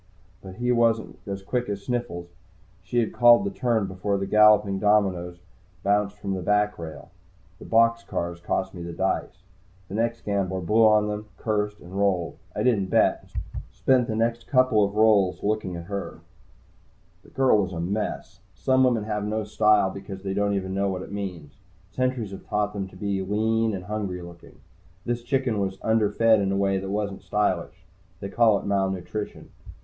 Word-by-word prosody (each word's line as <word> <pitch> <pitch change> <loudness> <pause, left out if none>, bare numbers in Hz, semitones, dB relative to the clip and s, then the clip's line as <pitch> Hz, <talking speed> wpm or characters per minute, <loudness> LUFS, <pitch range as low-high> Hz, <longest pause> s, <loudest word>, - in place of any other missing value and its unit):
But 95 -1 -10
he 120 +3 0
wasn't 115 -2 +1
as 100 -1 -5
quick 120 +3 -2
as 100 -1 -4
Sniffles. 120 -9 -3 0.5
She 90 +7 -4
had 115 -3 +1
called 120 +6 +6
the 200 - -1
turn 120 - 0
before 95 +2 -2
the 95 - -2
galloping 105 -2 +5
dominoes 95 -4 +2
had 90 +1 -31
bounced 105 0 +1
from 100 -1 -3
the 95 - -3
backrail. 105 -5 -1 0.5
The - - -11
box 115 0 +3
cars 85 -4 -4
cost 95 +2 -2
me 90 - -8
the 85 0 -6
dice. 90 0 -2 0.5
The - - -8
next 115 +2 -1
gambler 95 -2 -1
blew 105 +6 +3
on 105 -1 +4
them, 105 0 -4
cursed, 105 -1 -2
and 90 +1 -12
rolled. 95 -4 0 0.2
I - - -1
didn't 105 -7 +2
bet, - - +3 0.3
and - - -6
spent 130 -2 +2
the 110 - -2
next 115 +1 -1
couple 125 -6 +3
rolls 105 -3 +3
looking 105 -3 -1
at 85 - -6
her. 100 +3 -6 1.0
The - - -19
girl 130 -6 +3
was 95 -2 -3
a 85 - -5
mess. 100 +5 -3 0.2
Some 130 0 +2
women 120 -4 +2
have 105 -1 -2
no 110 +1 -2
style 105 -1 +3
because 95 0 -8
they 95 -1 -2
don't 100 0 +1
even 95 -1 -3
know 100 +1 0
what 95 -1 -3
it - - -11
means. 90 -8 -6 0.4
Courturiers 130 -5 -1
have 95 - -10
taught 105 0 -1
them 100 -2 -3
all - - -11
to 95 - -16
be 100 0 -2
lean 110 +2 0
and 90 - -6
hungry 100 -4 -4
looking. 85 -1 -14 0.4
This 120 0 -1
chicken 130 -3 0
was 95 -1 -2
underfed 110 0 +3
in 95 -1 0
a 100 - 0
way 100 -1 +1
that 95 0 -6
wasn't 100 -1 -3
stylish. 100 -4 -1 0.3
They 100 - -5
call 110 -1 +4
it - - -7
malnutrition. 95 0 -3
100 Hz, 185 wpm, -25 LUFS, 95-110 Hz, 1.0 s, called